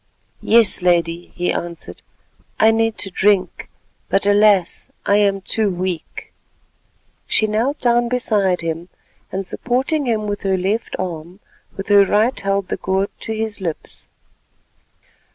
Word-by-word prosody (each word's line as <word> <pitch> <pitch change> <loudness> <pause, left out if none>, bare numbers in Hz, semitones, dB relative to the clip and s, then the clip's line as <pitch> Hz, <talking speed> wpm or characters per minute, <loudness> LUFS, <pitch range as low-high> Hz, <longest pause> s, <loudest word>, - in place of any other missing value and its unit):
"Yes, 225 -4 +4
Lady," 175 -1 0
he 180 0 -1
answered; 170 -1 -6 0.6
"I 220 +1 +6
need 225 0 0
to 195 - -3
drink, 195 0 +1 0.4
but 195 +1 +2
alas! 205 -3 +3 0.2
I 200 - +3
am 200 -1 +2
too 215 +2 0
weak." 180 -2 -5 0.9
She 220 - +2
knelt 225 +7 0
down 240 -1 +2
beside 205 -7 +1
him, 165 +1 -4 0.4
and 195 +1 -3
supporting 260 - -1
him 220 -3 0
with 205 -1 -3
her 190 -1 0
left 200 +5 -2
arm, 175 0 -6 0.4
with 195 +1 -6
her 200 -1 +7
right 215 +6 +1
held 195 -1 -1
the - - -2
gourd 190 +1 -1
to 225 - -4
his 220 -2 -4
lips. 165 -4 -6
200 Hz, 135 wpm, -19 LUFS, 185-220 Hz, 0.9 s, her